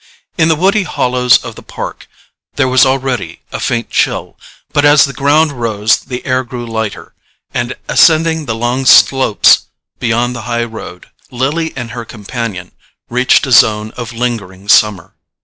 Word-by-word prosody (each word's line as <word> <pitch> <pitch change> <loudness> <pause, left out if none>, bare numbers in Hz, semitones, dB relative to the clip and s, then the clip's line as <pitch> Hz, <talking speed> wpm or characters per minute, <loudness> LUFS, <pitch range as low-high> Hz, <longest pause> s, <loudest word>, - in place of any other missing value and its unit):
In 160 -3 +2
the 160 - +3
woody 195 +6 +2
hollows 125 -7 +2
of - - -7
the - - -13
park - - -8 0.5
there 140 -2 +1
was 130 +1 +4
already 130 -3 -2
a - - -5
faint 120 0 -2
chill; - - -1 0.4
but 145 - +2
as 145 0 +6
the 140 - -7
ground 150 +3 +2
rose 110 -4 0
the 125 -2 -8
air 130 0 0
grew 120 -1 -7
lighter, 110 -2 -5 0.4
and 120 +1 -3
ascending 160 -1 +3
the 110 - -2
long 120 +3 -2
slopes 130 -6 +5 0.3
beyond 120 +1 -1
the 120 - -6
high 120 0 0
road, 110 -6 -10 0.2
Lily 145 +6 -2
and 120 -3 -6
her 115 0 -6
companion 105 -4 -6 0.4
reached 125 +3 +3
a 130 - -5
zone 110 -2 +4
of 120 -2 -7
lingering 110 -6 -4
summer. 105 -4 +2
125 Hz, 160 wpm, -13 LUFS, 115-135 Hz, 0.5 s, as